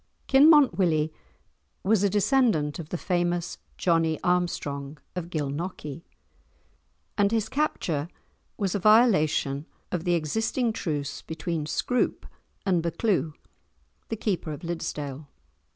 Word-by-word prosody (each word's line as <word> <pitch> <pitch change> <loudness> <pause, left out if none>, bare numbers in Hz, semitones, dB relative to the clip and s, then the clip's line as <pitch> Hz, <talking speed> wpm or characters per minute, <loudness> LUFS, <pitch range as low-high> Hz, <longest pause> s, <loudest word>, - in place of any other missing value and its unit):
Kinmont 285 -3 +6
Willie 155 -4 +2 0.7
was 205 0 +3
a 200 - +3
descendant 205 - +2
of 160 -2 -7
the 175 - -2
famous 175 -1 -1 0.2
Johnie 165 -2 +2
Armstrong 155 -5 -1 0.2
of 175 -2 -4
Gilnockie, 150 0 -4 1.2
and 200 0 +4
his 225 -2 +1
capture 170 - -1 0.5
was 195 -3 -1
a 205 - 0
violation 175 - +3 0.2
of 180 -3 -2
the 175 -1 +2
existing 220 - 0
truce 145 -7 -3
between 160 -1 -4
Scroope 250 +9 0 0.4
and 180 -4 +2
Buccleuch, 170 -2 0 0.7
the 225 - -1
Keeper 190 -7 -2
of 145 - -6
Liddesdale. 150 -4 -4
175 Hz, 115 wpm, -26 LUFS, 155-205 Hz, 1.2 s, Kinmont